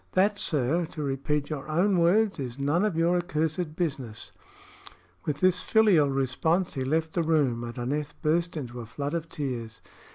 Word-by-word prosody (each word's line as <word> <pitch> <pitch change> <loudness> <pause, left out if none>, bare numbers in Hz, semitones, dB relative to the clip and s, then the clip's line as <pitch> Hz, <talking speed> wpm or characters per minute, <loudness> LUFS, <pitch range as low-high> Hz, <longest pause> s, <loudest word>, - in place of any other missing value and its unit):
"That, 200 +2 +2
sir, 155 +3 +2
to 155 -1 -6
repeat 145 +2 -1
your 150 0 -5
own 180 +4 +2
words, 195 +3 +3
is 125 -2 -5
none 145 +7 +1
of 210 -5 0
your 170 +2 +3
accursed 160 -2 -2
business." 135 -10 -3 0.9
With 150 -1 -2
this 185 0 +3
filial 200 -10 +4
response 135 +7 0
he 135 - -2
left 160 +4 0
the 175 - +1
room, 145 -8 +1
and 120 +1 -7
Aneth 145 +5 -3
burst 170 +2 +1
into 125 -4 -6
a 115 - -7
flood 145 +5 -4
of 165 -1 -3
tears. 120 -7 -5
155 Hz, 170 wpm, -27 LUFS, 135-170 Hz, 0.9 s, filial